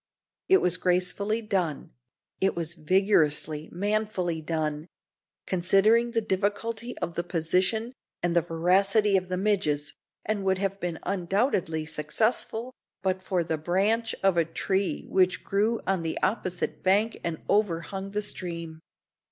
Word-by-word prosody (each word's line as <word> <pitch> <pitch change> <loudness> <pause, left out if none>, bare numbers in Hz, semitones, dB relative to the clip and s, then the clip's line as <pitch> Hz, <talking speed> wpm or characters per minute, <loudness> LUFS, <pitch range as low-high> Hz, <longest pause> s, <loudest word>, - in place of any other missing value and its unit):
It 380 - +6
was 180 - +3
gracefully 185 +5 +1
done; 185 -8 -2 0.5
it 190 - +1
was 170 -1 -1
vigorously, 155 -3 +2
manfully 195 -3 -1
done 155 -1 -2 0.6
considering 195 +6 +3
the 230 -1 0
difficulty 220 +4 -2
of 170 - -3
the 170 - -1
position, 185 +8 0 0.3
and 175 -1 +1
the 170 - +5
voracity 195 +6 +2
of 185 -1 0
the 185 - -1
midges 180 -8 0 0.3
and 215 -2 -1
would 190 -1 +2
have 195 0 -2
been 175 -3 -3
undoubtedly 185 - 0
successful 220 +10 -1 0.3
but 185 -1 0
for 185 -2 0
the 160 -1 -2
branch 200 +8 +1
of 195 -2 +3
a 170 - +5
tree 190 +4 -1
which 185 -1 +2
grew 215 +4 +1
on 190 -2 +1
the 165 -1 -3
opposite 185 -5 -1
bank 205 +4 +2
and 170 -2 -2
overhung 195 -1 0
the 210 +1 -2
stream. 170 -5 -4
190 Hz, 135 wpm, -27 LUFS, 170-210 Hz, 0.6 s, It